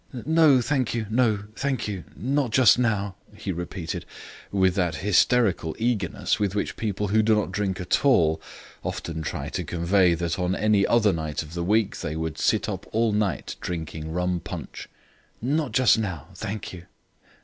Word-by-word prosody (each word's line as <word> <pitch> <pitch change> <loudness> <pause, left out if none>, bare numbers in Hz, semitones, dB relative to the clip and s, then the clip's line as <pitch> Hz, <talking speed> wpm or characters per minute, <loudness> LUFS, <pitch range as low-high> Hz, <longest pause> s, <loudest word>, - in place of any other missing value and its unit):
"No, 155 -4 +5
thank 130 -2 0
you, 115 -2 -1
no, 110 -4 +2
thank 135 -5 -1
you; 95 -4 -4
not 130 - 0
just 120 0 +5
now," 105 -5 0 0.2
he 100 - -4
repeated 85 -1 -5 0.5
with 95 -2 +3
that 90 -3 0
hysterical 105 -4 +3
eagerness 110 -5 0
with 100 -1 0
which 105 - -2
people 105 -2 -2
who 110 +2 +4
do 110 0 +3
not 105 -3 -1
drink 95 -1 -2
at 90 - 0
all 85 - +4 0.4
often 80 -1 -4
try 80 - -4
to - - -3
convey 85 +1 +2
that 85 +1 -2
on 90 +1 0
any 105 -2 +3
other 110 -4 +4
night 80 -2 -3
of 75 +1 -12
the 85 0 -2
week 105 +3 +1
they 75 - -4
would 80 -1 -3
sit - - +2
up - - -5
all 115 0 +2
night 105 - -1
drinking 80 -2 -5
rum 90 +1 0
punch. - - -8 0.5
"Not 140 +2 0
just 115 -1 +4
now, 90 -7 -4
thank 105 +2 -5
you." 90 -1 -10
100 Hz, 170 wpm, -25 LUFS, 85-110 Hz, 0.5 s, No